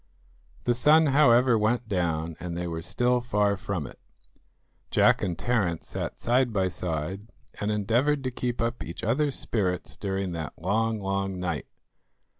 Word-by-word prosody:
The 120 Hz, -, +2 dB
sun, 150 Hz, +6 st, +5 dB
however, 125 Hz, -4 st, +5 dB
went 115 Hz, +3 st, +1 dB
down, 85 Hz, -5 st, -1 dB
and 85 Hz, -1 st, -5 dB
they 90 Hz, -, -2 dB
were 80 Hz, -1 st, -4 dB
still 125 Hz, +7 st, +1 dB
far 105 Hz, -4 st, +1 dB
from 95 Hz, -5 st, -4 dB
it. -, -, -11 dB, 0.9 s
Jack -, -, +4 dB
and 90 Hz, -4 st, -2 dB
Terence 100 Hz, -7 st, -1 dB
sat -, -, -4 dB
side 125 Hz, +1 st, +2 dB
by 95 Hz, -3 st, +1 dB
side, 90 Hz, +4 st, -4 dB, 0.3 s
and 105 Hz, -, -1 dB
endeavoured 120 Hz, +8 st, +1 dB
to 130 Hz, -, -2 dB
keep 120 Hz, -1 st, -3 dB
up 115 Hz, +1 st, -1 dB
each 85 Hz, -, -8 dB
other's 140 Hz, +6 st, +1 dB
spirits 95 Hz, -5 st, -1 dB
during 95 Hz, -2 st, -3 dB
that 80 Hz, -2 st, -5 dB
long, 110 Hz, +5 st, 0 dB
long 95 Hz, -1 st, -2 dB
night. 85 Hz, -5 st, -3 dB
105 Hz, 155 wpm, -27 LUFS, 90-120 Hz, 0.9 s, sun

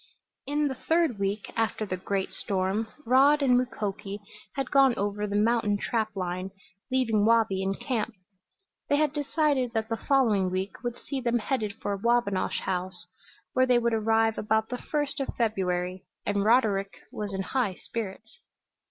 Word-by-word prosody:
In 295 Hz, +1 st, +1 dB
the 270 Hz, -, -2 dB
third 320 Hz, -4 st, +1 dB
week 200 Hz, +1 st, -2 dB
after 225 Hz, -1 st, 0 dB
the 185 Hz, -, -2 dB
great 190 Hz, +1 st, -2 dB
storm 195 Hz, +3 st, -1 dB, 0.2 s
Rod 280 Hz, +4 st, +5 dB
and 250 Hz, -2 st, +5 dB
Mukoki 210 Hz, -5 st, -2 dB, 0.4 s
had 275 Hz, -2 st, -3 dB
gone 270 Hz, -3 st, +5 dB
over 205 Hz, +1 st, -1 dB
the 200 Hz, -, -3 dB
mountain 210 Hz, -1 st, +2 dB
trap 220 Hz, 0 st, -1 dB
line, 185 Hz, 0 st, -3 dB, 0.4 s
leaving 235 Hz, -5 st, +2 dB
Wabi 220 Hz, -3 st, +3 dB
in 195 Hz, +1 st, -1 dB
camp. 235 Hz, -3 st, -2 dB, 0.7 s
They 285 Hz, -, +4 dB
had 300 Hz, -1 st, +2 dB
decided 290 Hz, -4 st, +1 dB
that 220 Hz, -1 st, -1 dB
the 225 Hz, -, -1 dB
following 220 Hz, -10 st, +2 dB
week 185 Hz, +2 st, -3 dB
would 240 Hz, -1 st, -3 dB
see 275 Hz, -2 st, -5 dB
them 240 Hz, -1 st, +1 dB
headed 220 Hz, -3 st, -2 dB
for 205 Hz, -, 0 dB
Wabinosh 225 Hz, -2 st, +1 dB
House, 185 Hz, -1 st, -3 dB, 0.5 s
where 255 Hz, 0 st, +3 dB
they 250 Hz, -1 st, +5 dB
would 235 Hz, -1 st, +1 dB
arrive 225 Hz, 0 st, +2 dB
about 220 Hz, +1 st, +1 dB
the 250 Hz, -, -4 dB
first 290 Hz, -1 st, -2 dB
of 275 Hz, -, -3 dB
February, 185 Hz, -5 st, -1 dB, 0.2 s
and 205 Hz, -1 st, +1 dB
Roderick 205 Hz, -4 st, +3 dB, 0.2 s
was 210 Hz, -1 st, -4 dB
in 195 Hz, 0 st, -2 dB
high 215 Hz, -2 st, -1 dB
spirits. 225 Hz, -, -7 dB
220 Hz, 160 wpm, -28 LUFS, 200-255 Hz, 0.7 s, Rod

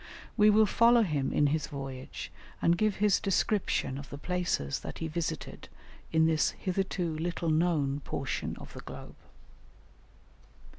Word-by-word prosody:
We 210 Hz, -1 st, +6 dB
will 215 Hz, +1 st, +6 dB
follow 235 Hz, +3 st, +5 dB
him 150 Hz, -8 st, -1 dB
in 145 Hz, -, +3 dB
his 155 Hz, -2 st, -1 dB
voyage 135 Hz, -2 st, -7 dB, 0.3 s
and 170 Hz, -, +3 dB
give 215 Hz, +2 st, +1 dB
his 205 Hz, -1 st, +3 dB
description 195 Hz, -8 st, 0 dB
of 140 Hz, -, -10 dB
the 140 Hz, -, -7 dB
places 175 Hz, -, -1 dB
that -, -, -7 dB
he 165 Hz, -, -3 dB
visited 160 Hz, -1 st, -4 dB, 0.4 s
in 160 Hz, 0 st, +4 dB
this 160 Hz, -1 st, +3 dB
hitherto 185 Hz, -3 st, -1 dB
little 170 Hz, 0 st, -1 dB
known 155 Hz, -4 st, +1 dB
portion -, -, -3 dB
of -, -, -11 dB
the -, -, -8 dB
globe. -, -, -10 dB
165 Hz, 145 wpm, -30 LUFS, 145-195 Hz, 0.4 s, We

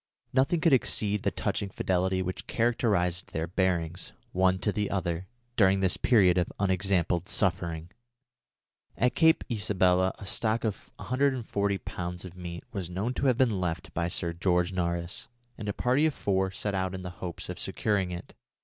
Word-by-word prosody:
Nothing 135 Hz, +6 st, +2 dB
could 165 Hz, -3 st, +4 dB
exceed 105 Hz, -5 st, +2 dB
the -, -, +1 dB
touching 100 Hz, -, -2 dB
fidelity 95 Hz, 0 st, 0 dB
which 90 Hz, 0 st, -5 dB
characterised 100 Hz, -7 st, +1 dB
their 80 Hz, +1 st, -1 dB
bearings, 85 Hz, -1 st, -1 dB, 0.2 s
one 95 Hz, 0 st, +3 dB
to 105 Hz, -, 0 dB
the 105 Hz, 0 st, -1 dB
other, 90 Hz, -1 st, -2 dB, 0.3 s
during 95 Hz, -2 st, +4 dB
this 95 Hz, -1 st, +2 dB
period 95 Hz, -7 st, +4 dB
of 90 Hz, -, -1 dB
unexampled 95 Hz, -1 st, +1 dB
suffering. 85 Hz, -4 st, 0 dB, 1.1 s
At 125 Hz, 0 st, +2 dB
Cape 160 Hz, +3 st, +4 dB
Isabella, 95 Hz, -4 st, +2 dB
a -, -, -9 dB
stock 110 Hz, +3 st, 0 dB
of 110 Hz, -3 st, -3 dB
140 125 Hz, -7 st, 0 dB
lbs. 90 Hz, -1 st, -5 dB
of 90 Hz, -1 st, -9 dB
meat 85 Hz, -1 st, -7 dB
was 95 Hz, -4 st, -4 dB
known 100 Hz, +8 st, -2 dB
to 135 Hz, -, 0 dB
have 125 Hz, -3 st, +3 dB
been 115 Hz, -8 st, +2 dB
left 85 Hz, -2 st, -3 dB
by 85 Hz, +1 st, 0 dB
Sir 85 Hz, -1 st, -1 dB
George 90 Hz, +1 st, +1 dB
Nares, 85 Hz, -1 st, -2 dB, 0.3 s
and 105 Hz, -2 st, -5 dB
a -, -, +2 dB
party 130 Hz, +8 st, +2 dB
of 155 Hz, -, -2 dB
four 95 Hz, -1 st, +1 dB
set 100 Hz, +2 st, -3 dB
out 95 Hz, -1 st, -1 dB
in 95 Hz, -, -6 dB
the 90 Hz, -, -5 dB
hopes 90 Hz, -2 st, -5 dB
of -, -, -6 dB
securing 100 Hz, -4 st, 0 dB
it. 90 Hz, 0 st, -7 dB
95 Hz, 170 wpm, -28 LUFS, 90-105 Hz, 1.1 s, could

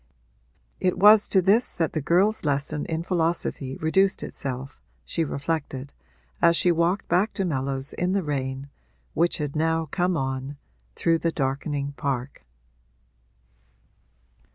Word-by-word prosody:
It 180 Hz, -1 st, +1 dB
was 210 Hz, +2 st, +7 dB
to 190 Hz, -2 st, +3 dB
this 210 Hz, +6 st, +3 dB
that 165 Hz, -3 st, -1 dB
the 155 Hz, -, -1 dB
girl's 190 Hz, +9 st, +2 dB
lesson 145 Hz, 0 st, -1 dB
in 160 Hz, 0 st, -2 dB
philosophy 165 Hz, -6 st, -1 dB
reduced 190 Hz, +6 st, +1 dB
itself, 135 Hz, -, -6 dB, 0.3 s
she 165 Hz, -, -1 dB
reflected, 145 Hz, -2 st, -3 dB, 0.5 s
as 170 Hz, 0 st, +5 dB
she 175 Hz, -, +3 dB
walked 170 Hz, +4 st, +1 dB
back 195 Hz, +5 st, +2 dB
to 195 Hz, -, -1 dB
Mellows 135 Hz, -3 st, -2 dB
in 180 Hz, +1 st, -1 dB
the 195 Hz, -1 st, +1 dB
rain, 135 Hz, -2 st, -3 dB, 0.4 s
which 170 Hz, +2 st, +2 dB
had 150 Hz, -3 st, -4 dB
now 160 Hz, +1 st, +1 dB
come 175 Hz, +3 st, 0 dB
on, 135 Hz, +1 st, -3 dB, 0.4 s
through 165 Hz, -1 st, +2 dB
the 165 Hz, +1 st, 0 dB
darkening 140 Hz, 0 st, -2 dB
park. 135 Hz, -, -3 dB
160 Hz, 130 wpm, -25 LUFS, 140-175 Hz, 0.5 s, was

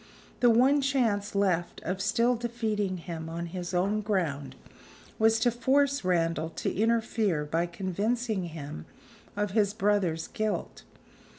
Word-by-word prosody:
The 245 Hz, -, +5 dB
one 260 Hz, +5 st, +5 dB
chance 225 Hz, -7 st, 0 dB
left 180 Hz, -4 st, +1 dB
of 185 Hz, +3 st, -2 dB
still 235 Hz, +4 st, +2 dB
defeating 220 Hz, -5 st, -2 dB
him 165 Hz, -2 st, -6 dB
on 170 Hz, +1 st, -4 dB
his 175 Hz, +1 st, -5 dB
own 195 Hz, +4 st, +1 dB
ground 170 Hz, -10 st, -2 dB, 0.6 s
was 225 Hz, 0 st, +4 dB
to 240 Hz, -, +4 dB
force 275 Hz, +3 st, +2 dB
Randal 165 Hz, -3 st, +1 dB
to -, -, -3 dB
interfere 220 Hz, -6 st, +1 dB
by 165 Hz, +3 st, 0 dB
convincing 200 Hz, +4 st, -1 dB
him 145 Hz, -, -7 dB, 0.5 s
of 205 Hz, -1 st, 0 dB
his 205 Hz, -1 st, +2 dB
brother's 200 Hz, -6 st, +1 dB
guilt. 215 Hz, -1 st, -3 dB
200 Hz, 130 wpm, -28 LUFS, 175-225 Hz, 0.6 s, The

